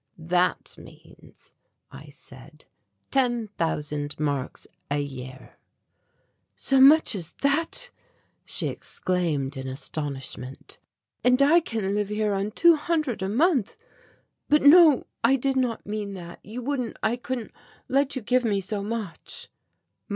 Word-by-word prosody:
"That 175 +2 0
means," - - -17 0.4
I - - -12
said, - - -14 0.5
"ten 240 -5 +1
thousand 150 -5 -3
marks 145 -3 -3 0.2
a 145 - 0
year." 130 -2 -8 1.0
"So 270 -1 +2
much 295 +1 +7
as 175 -5 -4
that!" 325 - 0 0.5
she - - -2
exclaimed 155 -7 -2
in 130 0 -5
astonishment. 135 -1 -6 0.4
"And 250 +1 +4
I 295 +5 +6
can 220 - -3
live 205 -1 -1
here 210 0 0
on 195 +1 -1
two 335 +9 +5
hundred 305 - -1
a 190 - -1
month, 270 - +1 0.7
but 300 -1 +4
no, 305 -2 +7 0.2
I 250 +4 +5
did 270 +1 0
not 250 -3 -1
mean 205 -1 -4
that 175 -2 -9
you 235 +4 -7
wouldn't, 255 -3 -3
I 220 +2 +2
couldn't 245 -2 -5 0.4
let 275 +2 +1
you 260 - -4
give 250 +3 +2
me 205 -4 +1
so 200 +2 -3
much." 210 -5 -6
215 Hz, 130 wpm, -25 LUFS, 170-265 Hz, 1.0 s, much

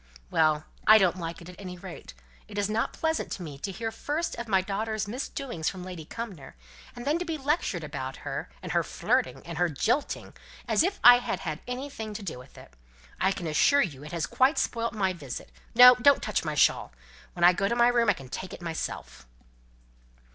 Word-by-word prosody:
"Well! 155 -1 +2 0.2
I 215 - +10
don't 185 -3 +2
like 170 0 -6
it, - - -12
at 180 - -13
any 180 -2 -7
rate. 170 - -10 0.3
It 205 - -9
is 205 0 0
not 225 +1 0
pleasant 320 0 -2
to 185 - -6
me 145 -4 -8
to 195 - -4
hear 225 +4 -4
first 305 +8 -3
of 235 0 -6
my 195 -3 +3
daughter's 215 +3 -2
misdoings 240 - -3
from 185 -2 -8
Lady 180 -4 -8
Cumnor, 190 - -8 0.4
and 240 - -8
then 300 +4 +1
to - - -1
be 330 -2 -3
lectured 295 +4 -1
about - - -5
her, - - -4
and - - -5
her - - +3
flirting, - - -1
and 170 -1 -6
her 175 -1 +3
jilting, 240 - -1 0.3
as - - +3
if 390 +4 0
I 245 0 +10
had 245 - -3
had 155 -3 -4
anything 250 -4 -5
to 205 - -6
do 160 -9 -5
with 125 - -15
it. - - -14 0.5
I 190 - +3
can 180 - -5
assure 165 - +4
you 145 -5 -6
it 150 - -9
has 170 -3 -1
quite 265 +4 +2
spoilt 230 -1 -1
my 190 -3 +1
visit. 145 -8 -8 0.2
No! 250 +1 +11
don't 250 +3 +4
touch 215 - -1
my 155 -2 -3
shawl. 140 - +3 0.4
When 175 - -3
I 175 +1 +8
go 195 +3 0
to 235 - 0
my 240 0 +5
room 235 -2 +3
I - - +5
can 135 -7 -11
take 185 +8 -6
it - - -8
myself." 165 - -5
200 Hz, 215 wpm, -28 LUFS, 170-245 Hz, 0.5 s, No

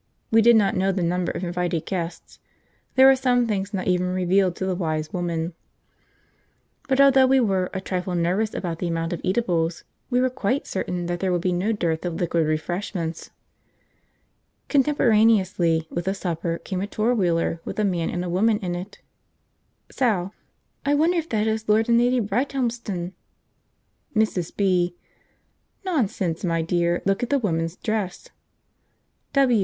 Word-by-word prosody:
We 225 0 +6
did 235 +1 +6
not 205 -3 +3
know 190 +1 +2
the 185 -2 -1
number 175 +1 0
of - - -5
invited 175 -2 -2
guests 175 -3 -5 0.6
(there 265 0 +8
are 270 - +7
some 250 -2 +2
things 200 -3 -2
not 190 -2 -3
even 180 0 +1
revealed 185 0 +1
to 190 - -3
the 190 - 0
Wise 155 -4 -2
Woman), 170 -1 -2 1.4
but 265 0 +2
although 270 -1 +6
we 265 +1 +4
were 190 -6 +1
a 190 - -3
trifle 180 -1 -3
nervous 185 +6 0
about 170 -3 -3
the 180 - -2
amount 165 0 -2
of 170 - -5
eatables, 175 -5 0 0.3
we 245 -1 +2
were 255 0 +2
quite 255 +1 -1
certain 180 -2 -3
that 175 0 -3
there 190 0 0
would 175 -1 0
be 185 - +1
no 185 +5 0
dearth 170 -7 -1
of 175 -2 -3
liquid 165 -2 0
refreshment. 165 +1 -3 1.4
Contemporaneously 215 - +3
with 175 0 -3
the 190 +1 0
supper 170 -3 -2
came 185 +1 -4
a 200 - -2
four 220 +3 0
wheeler 170 -5 0
with - - -6
a 215 - +1
man 175 -4 0
and 175 0 -3
a - - -3
woman 210 +5 +2
in 180 -3 -4
it. 185 +4 -7 0.9
Sal. 205 -7 0 0.5
"I 285 +1 +2
wonder 335 +4 +3
if 325 - -6
that 215 -1 0
is 220 0 -2
Lord 220 +1 +4
and 235 0 +4
Lady 245 +1 +3
Brighthelmston?" 230 -5 -2 1.0
Mrs. 210 -6 0
B. 180 -3 +2 0.9
"Nonsense, 200 - -1
my 165 -2 0
dear; 175 +1 0
look 195 +3 +1
at 245 - -2
the 285 - +3
woman's 165 -7 -1
dress." 210 -5 -3
190 Hz, 165 wpm, -24 LUFS, 175-225 Hz, 1.4 s, there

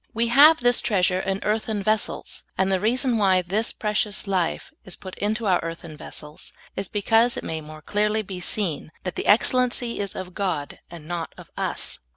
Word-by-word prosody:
" - - -45
We 230 +1 +1
have 295 +6 +7
this 245 0 +4
treasure 185 -3 +1
in 195 +1 -2
earthen 215 -1 -1
vessels," 215 +2 -1 0.2
and 190 0 +2
the 190 - +2
reason 240 +3 +2
why 190 -3 +4
this 205 +6 0
precious 210 -1 -1
life 190 - -1
is 190 - -6
put 185 -2 -10
into 215 +3 -1
our 185 -3 +3
earthen 165 -1 -7
vessels 150 0 -8 0.2
is 195 0 -3
because 225 +4 +2
it - - -4
may 160 -1 -4
more 155 0 -11
clearly 210 +3 +1
be 190 -2 -7
seen 175 -5 -2
"that 185 - -3
the - - -3
excellency 245 +2 +3
is 200 -2 -3
of 185 -1 -6
God," 175 -8 -3
and 165 -3 -11
not 170 -1 -4
of - - -13
us. - - -1
200 Hz, 190 wpm, -24 LUFS, 180-220 Hz, 0.2 s, have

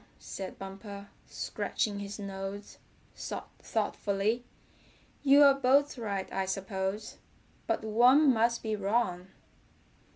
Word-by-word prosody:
said 190 -1 -7
Bumper, 200 +1 -8 0.2
scratching 205 -3 -2
his 200 0 -6
nose 195 0 -6 0.4
thoughtfully. 205 +4 -2 0.8
"You're 280 0 +7
both 275 +2 +3
right, 200 -6 -3
I 190 0 -1
suppose, 190 +1 -3 0.5
but - - 0
one 250 +6 +5
must 235 +1 +1
be 220 -1 -1
wrong." 195 -3 0
205 Hz, 95 wpm, -30 LUFS, 195-240 Hz, 0.8 s, You're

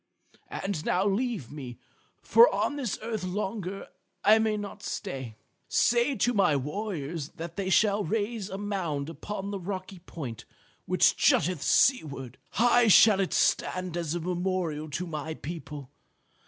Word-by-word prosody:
And 190 -6 -3
now 185 +2 +1
leave 205 - -1
me, 130 -5 -8 0.5
for 475 +2 +7
on - - 0
this 255 -8 -2
earth 220 -3 -3
longer 195 0 -4 0.4
I 215 +2 +6
may 220 -1 +1
not 205 0 -7
stay. 135 - -5 0.3
Say 240 +4 +3
to 245 0 +1
my 195 -8 +3
warriors 150 0 -4
that 170 -1 -7
they 195 -2 -2
shall 205 +1 +3
raise 215 +2 -2
a 190 - -5
mound 175 -8 -3
upon 200 +3 -6
the 200 - -4
rocky 185 0 -6
point 140 - -8 0.4
which - - +4
jutteth 175 -2 +2
seaward. 140 - +1
High 240 +1 +4
shall 210 -1 +7
it 195 - 0
stand 185 -2 0
as 170 -2 -2
a - - -1
memorial 175 -3 -2
to 170 +5 -3
my 155 -1 -5
people. 150 -4 -8
185 Hz, 145 wpm, -28 LUFS, 155-210 Hz, 0.5 s, for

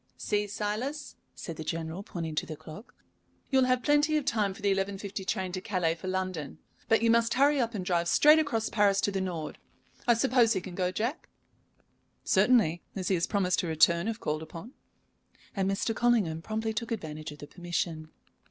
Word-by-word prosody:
"See, 210 -1 -1
Silas," 240 +8 -4 0.2
said 165 -3 -7
the 160 - -5
General, 165 +3 -4
pointing 165 -5 -5
to 150 - -2
the 155 - -5
clock, 160 - -12 0.6
"you 265 - +4
will 255 - +3
have 255 -1 +1
plenty 295 +1 +3
of 295 - -2
time 210 -5 +1
for - - -13
the 200 -1 +3
11.50 195 0 -3
train 185 -2 -1
to 185 0 -4
Calais 185 -6 0
for 170 +3 -8
London, 185 -6 -3 0.3
but 225 0 +4
you 230 - +5
must 230 0 +3
hurry 285 +2 +4
up 230 -1 -2
and 185 -3 -3
drive 175 -2 +1
straight 300 - +6
across 230 -8 0
Paris 205 -2 +3
to 205 - +1
the 195 -1 -1
Nord. 170 -5 -4 0.5
I 240 - +6
suppose 230 0 +3
he 190 - -1
can 180 - -8
go, 180 0 0
Jack?" 235 - -3 0.9
"Certainly, 195 -10 +3
as 185 -2 -2
he - - +3
has 170 -2 +1
promised 190 -3 +1
to 175 - -1
return 170 +3 +3
if 225 0 -3
called 155 +1 -2
upon." 165 - -9 0.8
And 195 -1 0
Mr. 195 +3 -1
Collingham 215 -10 +2
promptly 220 +3 -3
took 225 +2 -4
advantage 155 -8 -5
of - - -13
the 145 - -9
permission. 170 -2 -4
195 Hz, 200 wpm, -29 LUFS, 170-230 Hz, 0.9 s, straight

